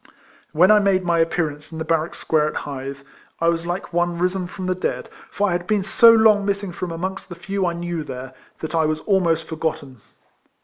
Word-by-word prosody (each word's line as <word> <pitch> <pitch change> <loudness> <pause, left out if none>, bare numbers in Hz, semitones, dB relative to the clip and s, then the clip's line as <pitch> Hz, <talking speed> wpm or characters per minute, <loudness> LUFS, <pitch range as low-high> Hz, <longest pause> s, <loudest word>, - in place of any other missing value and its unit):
When 180 +6 +5
I 210 - +7
made 195 -2 +2
my 170 -1 +2
appearance 155 -2 -1
in 160 - -7
the 160 - -4
bar 165 0 +2
rack 165 - -7
square 155 -1 +1
at - - -5
Hythe, 140 0 -5 0.4
I 165 - +3
was 170 0 -1
like 175 +1 -4
one 175 0 0
risen 180 +1 -1
from 185 +1 -7
the 185 - +1
dead; 185 - -3 0.2
for 205 0 0
I - - 0
had 175 0 -2
been 210 -2 +1
so 230 +4 +7
long 220 -2 +5
miss 200 0 -1
ing 195 - -5
from 175 0 -5
amongst 190 +4 -5
the 175 - -7
few 190 +2 -2
I 170 - -1
knew 170 -1 -4
there, 130 -2 -8 0.3
that 160 - -5
I 160 -1 +2
was 155 0 -1
almost 170 -5 +1
forgotten. 150 -6 -4
175 Hz, 225 wpm, -22 LUFS, 160-190 Hz, 0.4 s, I